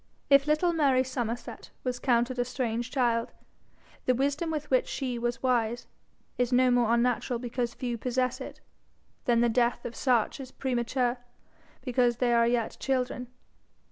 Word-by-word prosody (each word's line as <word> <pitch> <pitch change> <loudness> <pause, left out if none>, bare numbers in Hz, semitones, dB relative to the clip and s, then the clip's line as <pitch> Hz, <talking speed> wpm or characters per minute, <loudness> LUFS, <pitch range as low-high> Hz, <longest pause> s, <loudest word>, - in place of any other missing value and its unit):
If 275 +1 +6
little 310 +3 +2
Mary 275 -5 +3
Somerset 245 -2 -5
was 250 -1 -2
counted 245 0 +1
a - - +3
strange 240 -1 -2
child, 240 -3 0 0.7
the 255 - +4
wisdom 285 +5 0
with 300 -2 -4
which 255 - +3
she 250 -3 -3
was 240 +1 -2
wise 240 -2 +1 0.5
is 245 0 +1
no 255 0 +4
more 240 -2 +3
unnatural 240 +1 +1
because 240 0 -3
few 240 -2 -3
possess 255 +1 -1
it, - - -8 0.6
than 235 -1 +3
the 240 - +4
death 235 +1 +1
of 235 - -5
such 245 -3 +1
is 260 -2 -8
premature 245 -1 -1 0.6
because 245 -2 +2
they 245 -1 +2
are 235 0 +4
yet 235 -2 0
children. 250 -2 -1
245 Hz, 155 wpm, -28 LUFS, 240-260 Hz, 0.7 s, If